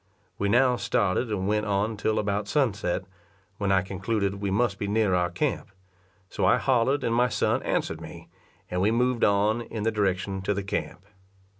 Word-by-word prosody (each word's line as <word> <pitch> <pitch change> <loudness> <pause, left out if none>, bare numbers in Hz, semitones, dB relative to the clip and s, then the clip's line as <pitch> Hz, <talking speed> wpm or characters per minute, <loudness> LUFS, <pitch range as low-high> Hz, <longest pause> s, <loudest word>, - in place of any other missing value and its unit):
We 100 - 0
now 125 +3 +4
started 100 +2 0
and 95 -3 -2
went 105 +1 0
on 105 +2 0
till 110 +1 -1
about 100 0 -1
sunset, 105 -11 0 0.6
when 100 -1 0
I 95 -1 +3
concluded 100 +1 -2
we 100 - -1
must 100 0 0
be 100 - -2
near 105 -2 +2
our 90 -1 +2
camp; - - -2 0.6
so - - -4
I - - +5
hollered 130 +2 +1
and 115 - 0
my 125 +1 +3
son - - 0
answered - - -2
me, - - -10 0.4
and 90 0 -2
we 100 - +3
moved 125 +1 +1
on 105 +3 +3
in 110 -2 -5
the 115 - +1
direction 95 -2 -1
to 100 +1 -1
the 100 - -2
camp. 95 -1 -4
105 Hz, 185 wpm, -26 LUFS, 95-115 Hz, 0.6 s, I